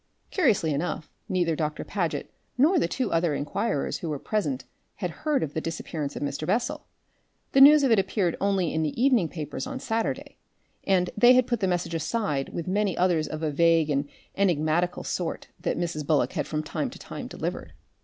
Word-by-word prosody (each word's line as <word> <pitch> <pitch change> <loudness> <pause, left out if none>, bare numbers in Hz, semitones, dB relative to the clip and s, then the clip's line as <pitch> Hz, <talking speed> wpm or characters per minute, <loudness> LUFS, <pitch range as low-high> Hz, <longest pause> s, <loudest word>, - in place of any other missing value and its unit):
Curiously 215 - +2
enough, 155 +1 -3 0.2
neither 175 -3 +1
Doctor 150 -1 -2
Paget 165 -8 -3 0.2
nor 320 +8 +5
the - - +1
two 260 - -2
other 165 -2 +2
inquirers 185 +3 -1
who 165 - -4
were 150 - -2
present 145 -7 -2 0.3
had 180 -4 -3
heard 295 - 0
of 150 - -4
the 160 - -2
disappearance 160 -3 -4
of - - -4
Mr. 145 +2 -3
Bessel 250 +10 -1 0.6
the 270 - +5
news 295 +1 +9
of 265 - +3
it 225 - +5
appeared 190 -3 0
only 195 -4 +1
in 160 - 0
the 155 +6 -2
evening 245 - +3
papers 155 - -5
of 265 -1 -5
Saturday 225 -2 -2 0.5
and 180 -2 +2
they 240 +4 +7
had 255 -1 +5
put 240 -2 -1
the 195 - +1
message 175 -2 -1
aside 160 -4 -1
with 170 - -5
many 200 -1 0
others 175 -4 +2
of 155 +1 -5
a 155 - 0
vague 165 0 +3
and 140 0 0 0.3
enigmatical 175 -1 +1
sort 175 -3 -3
that - - -1
Mrs. 170 -3 -2
Bullock 145 0 +1
has - - -2
from 155 -1 -2
time 150 - -3
to - - -11
time - - -7
delivered. - - -5
175 Hz, 195 wpm, -26 LUFS, 155-215 Hz, 0.6 s, news